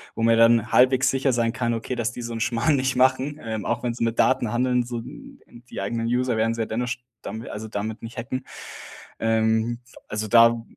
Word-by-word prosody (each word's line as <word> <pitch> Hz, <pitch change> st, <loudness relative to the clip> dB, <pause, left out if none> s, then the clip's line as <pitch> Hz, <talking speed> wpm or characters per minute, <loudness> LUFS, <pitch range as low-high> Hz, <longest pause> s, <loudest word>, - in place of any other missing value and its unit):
wo 115 Hz, -, -2 dB
man 115 Hz, 0 st, +5 dB
ja 115 Hz, -, +3 dB
dann 115 Hz, -1 st, +2 dB
halbwegs 130 Hz, +1 st, +4 dB
sicher 135 Hz, -1 st, +1 dB
sein 115 Hz, -1 st, +1 dB
kann, 120 Hz, -1 st, -1 dB
okay, 115 Hz, +3 st, -3 dB
dass 115 Hz, -1 st, -1 dB
die 120 Hz, -, -8 dB
so 115 Hz, 0 st, -5 dB
'n 115 Hz, -, -4 dB
Schmarrn 120 Hz, +6 st, +1 dB
nicht 130 Hz, -1 st, 0 dB
machen. 130 Hz, +3 st, +2 dB
Ähm, 110 Hz, -2 st, -4 dB
auch 120 Hz, +1 st, -2 dB
wenn 120 Hz, -1 st, -1 dB
sie 115 Hz, -, -3 dB
mit 115 Hz, 0 st, -1 dB
Daten 115 Hz, -, +2 dB
handeln, 125 Hz, 0 st, +1 dB
so 120 Hz, -1 st, -5 dB
die 120 Hz, -2 st, -11 dB
eigenen 115 Hz, +3 st, -2 dB
User 125 Hz, 0 st, 0 dB
werden 115 Hz, +1 st, +1 dB
sie 115 Hz, -, -3 dB
ja -, -, 0 dB
dennoch 120 Hz, +3 st, -3 dB
sch 125 Hz, -, -3 dB, 0.2 s
damit 110 Hz, +3 st, -7 dB
also 110 Hz, +2 st, -6 dB
damit 105 Hz, +2 st, -4 dB
nicht 115 Hz, 0 st, -9 dB
hacken. 130 Hz, +2 st, -4 dB, 0.7 s
Ähm, 110 Hz, +1 st, +1 dB, 0.3 s
also 110 Hz, 0 st, -3 dB
da 115 Hz, +1 st, +5 dB
115 Hz, 225 wpm, -24 LUFS, 115-125 Hz, 0.7 s, man